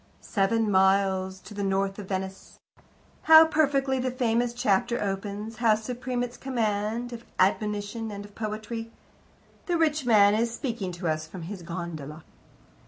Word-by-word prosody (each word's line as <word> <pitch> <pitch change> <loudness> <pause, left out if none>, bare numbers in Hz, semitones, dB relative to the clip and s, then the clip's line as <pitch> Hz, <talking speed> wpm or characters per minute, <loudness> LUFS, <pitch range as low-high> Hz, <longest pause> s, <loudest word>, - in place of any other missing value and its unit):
"Seven 210 +1 0
miles 190 0 +2
to - - -11
the 205 - -4
north 195 0 0
of 200 - -7
Venice 190 0 -5 0.3
" - - -32
How 320 0 +10
perfectly 280 -4 +1
the 255 +1 0
famous 245 -1 0
chapter 240 -1 +1
opens! 205 +2 -4
How 225 -2 +4
supreme 245 +2 -3
its 245 0 -6
command 230 -1 -2
of 235 0 -8
admonition 210 +3 0
and 205 -1 -7
of 205 - -15
poetry! 220 +2 -5 0.8
The 350 -1 +1
rich 310 -3 +1
man 210 -4 +5
is 230 +2 +1
speaking 230 -6 -3
to 175 0 -4
us 155 0 -1
from 175 +1 -9
his 185 +2 -7
gondola. 165 -3 -6
215 Hz, 155 wpm, -27 LUFS, 195-240 Hz, 0.8 s, How